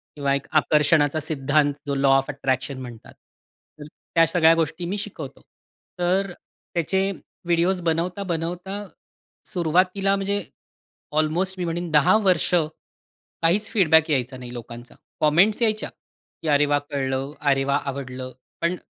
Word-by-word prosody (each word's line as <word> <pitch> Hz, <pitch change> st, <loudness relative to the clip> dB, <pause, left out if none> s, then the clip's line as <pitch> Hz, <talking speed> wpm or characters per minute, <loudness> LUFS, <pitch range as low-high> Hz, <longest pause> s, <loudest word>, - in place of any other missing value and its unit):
किंवा 140 Hz, -2 st, 0 dB
एक 140 Hz, -, -4 dB
आकर्षणाचा 150 Hz, 0 st, +3 dB
सिद्धांत 145 Hz, -1 st, +1 dB
जो, 140 Hz, -, -2 dB
लॉ 135 Hz, 0 st, +2 dB
ऑफ 135 Hz, -, -1 dB
अट्रॅक्शन 135 Hz, 0 st, -2 dB
म्हणतात. 120 Hz, -3 st, -10 dB, 0.7 s
तर 145 Hz, -, -8 dB, 0.3 s
त्या 165 Hz, 0 st, +6 dB
सगळ्या 165 Hz, -1 st, +5 dB
गोष्टी 165 Hz, +1 st, -2 dB
मी 190 Hz, +4 st, -2 dB
शिकवतो. 195 Hz, -, -7 dB, 0.6 s
तर 185 Hz, +2 st, +1 dB, 0.4 s
त्याचे 190 Hz, +4 st, 0 dB, 0.3 s
व्हिडिओज 175 Hz, +2 st, +1 dB
बनवता-बनवता 175 Hz, +3 st, -2 dB, 0.6 s
सुरुवातीला, 185 Hz, +3 st, +1 dB
म्हणजे 200 Hz, +1 st, -1 dB, 0.8 s
ऑल्मोस्ट 175 Hz, +5 st, +1 dB
मी 180 Hz, -, -1 dB
म्हणीन 170 Hz, +1 st, -3 dB
10 150 Hz, +8 st, +5 dB
वर्ष 185 Hz, -1 st, +2 dB, 0.9 s
काहीच 195 Hz, +6 st, +2 dB
फीडबॅक 160 Hz, -7 st, +4 dB
यायचा 130 Hz, -2 st, -1 dB
नाही 125 Hz, -1 st, -9 dB
लोकांचा. 120 Hz, 0 st, -10 dB, 0.2 s
कॉमेंट्स 175 Hz, +9 st, +3 dB
यायच्या, 215 Hz, -2 st, +1 dB, 0.5 s
की -, -, -5 dB
"अरे 145 Hz, -1 st, +4 dB
वाह! 145 Hz, 0 st, +2 dB
कळलं. 135 Hz, -1 st, -2 dB
अरे, 135 Hz, -2 st, +2 dB
वाह! 140 Hz, +1 st, +1 dB
आवडलं." 130 Hz, -1 st, -6 dB, 0.3 s
पण 170 Hz, +2 st, +1 dB
160 Hz, 130 wpm, -23 LUFS, 140-180 Hz, 0.9 s, त्या